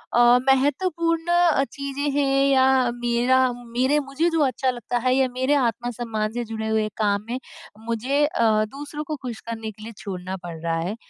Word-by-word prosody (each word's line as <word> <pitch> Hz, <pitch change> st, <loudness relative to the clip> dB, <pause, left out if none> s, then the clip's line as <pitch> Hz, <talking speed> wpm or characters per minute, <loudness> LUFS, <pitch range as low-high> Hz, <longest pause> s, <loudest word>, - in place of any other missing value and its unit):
अ, -, -, +5 dB, 0.3 s
महत्वपूर्ण 330 Hz, +5 st, +1 dB
अ, 345 Hz, -5 st, +4 dB
चीज़ें 280 Hz, +1 st, -3 dB
हैं 275 Hz, -1 st, +2 dB
या 265 Hz, -1 st, +4 dB, 0.3 s
मेरा 240 Hz, +1 st, +2 dB, 0.2 s
मेरे 245 Hz, +4 st, 0 dB
मुझे 285 Hz, +4 st, 0 dB
जो 330 Hz, -1 st, 0 dB
अच्छा 260 Hz, 0 st, 0 dB
लगता 245 Hz, 0 st, -3 dB
है 255 Hz, -, +4 dB
या 265 Hz, -1 st, +3 dB
मेरे 260 Hz, +3 st, +1 dB
आत्म-सम्मान 230 Hz, -2 st, -2 dB
से 240 Hz, 0 st, -2 dB
जुड़े 220 Hz, 0 st, -4 dB
हुए 220 Hz, -1 st, +1 dB
काम 205 Hz, -2 st, +1 dB
में 250 Hz, +2 st, -2 dB, 0.5 s
मुझे 255 Hz, +6 st, 0 dB
अ, 220 Hz, -7 st, +2 dB
दूसरों 295 Hz, +2 st, -6 dB
को 305 Hz, +1 st, -4 dB
खुश 245 Hz, -4 st, -6 dB
करने 225 Hz, -1 st, -5 dB
के 215 Hz, +1 st, -14 dB
लिए 225 Hz, -, -7 dB
छोड़ना 185 Hz, -2 st, -5 dB
पड़ 170 Hz, -2 st, -6 dB
रहा 165 Hz, 0 st, -1 dB
है। 180 Hz, +6 st, -3 dB
245 Hz, 180 wpm, -23 LUFS, 220-280 Hz, 0.5 s, अ